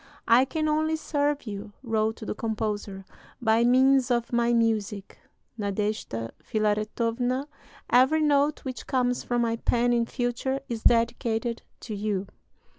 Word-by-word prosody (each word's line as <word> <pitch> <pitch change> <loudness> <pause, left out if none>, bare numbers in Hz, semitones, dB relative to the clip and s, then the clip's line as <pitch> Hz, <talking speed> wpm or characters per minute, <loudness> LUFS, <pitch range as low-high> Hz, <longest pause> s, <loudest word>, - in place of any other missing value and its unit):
"I 240 +3 +6
can 310 +3 -2
only 310 +1 +1
serve 290 -2 -1
you," 205 -1 -7
wrote 220 -1 -1
the - - -2
composer, 210 -3 -3 0.3
"by 225 -1 +3
means 260 +1 +4
of 240 -1 0
my 235 0 +2
music. 215 -4 0 0.4
Nadeshda 200 - -2
Filaretowna, 230 +5 -1 0.4
every 265 +6 +4
note 290 0 +2
which 255 -1 -6
comes 250 -2 0
from 240 -1 0
my 230 0 0
pen 240 +1 +1
in 235 -1 +1
future 245 +2 -2
is 230 -2 -4
dedicated 230 0 +1 0.2
to 220 - -6
you!" 205 -2 -2
235 Hz, 130 wpm, -26 LUFS, 215-260 Hz, 0.4 s, I